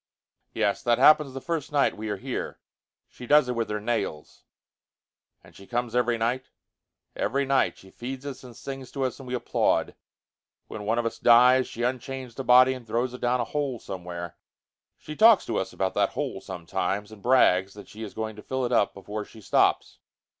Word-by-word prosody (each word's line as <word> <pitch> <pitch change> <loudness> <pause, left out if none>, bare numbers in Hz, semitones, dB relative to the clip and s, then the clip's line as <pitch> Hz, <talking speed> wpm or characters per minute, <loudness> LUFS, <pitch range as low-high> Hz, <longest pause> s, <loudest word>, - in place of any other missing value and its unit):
"Yes. 100 - 0
That 120 -1 +2
happens 150 -3 +5
the - - -3
first 165 -2 -3
night 145 -1 +2
we 110 0 -5
are 105 - -2
here. - - -5 0.5
She 125 - -12
does 150 -1 +5
it 125 - -1
with 115 -1 -2
her 105 0 -2
nails." 105 -9 -4 1.0
"And - - -18
she 100 - -14
comes 120 -1 -2
every 120 -1 +2
night?" 120 +3 -2 0.7
"Every 140 +2 0
night. 135 0 +1
She 95 - -16
feeds 130 +3 -7
us 140 -2 -7
and 125 -3 -12
sings 135 -2 -8
to 135 - -2
us 130 +1 -2
and 135 - -10
we 125 - -2
applaud. 125 - 0 0.7
When 105 -1 -7
one 110 +3 +1
of 120 - 0
us 115 - -3
dies, 125 +2 +6
she 120 - -7
unchains 130 0 -3
the 135 - -5
body, 130 +1 +6
and 125 -3 -10
throws 120 +3 -1
it 125 - -9
down 125 +1 +1
a - - -1
hole 140 -3 -2
somewhere. 90 -4 -7 0.6
She 155 - -9
talks 220 +2 +6
to 115 - -2
us 95 - -2
about 95 -1 -2
that - - +1
hole - - -3
sometimes 95 +4 -3
and 110 -2 -13
brags 95 -6 +3
that 105 - -11
she 110 - -12
is 110 -3 -7
going 110 -1 -4
to - - -9
fill 130 +3 -2
it 120 - -3
up 115 -4 +2
before 105 +2 -6
she 110 - -15
stops." 105 - +1
120 Hz, 205 wpm, -26 LUFS, 105-130 Hz, 1.0 s, dies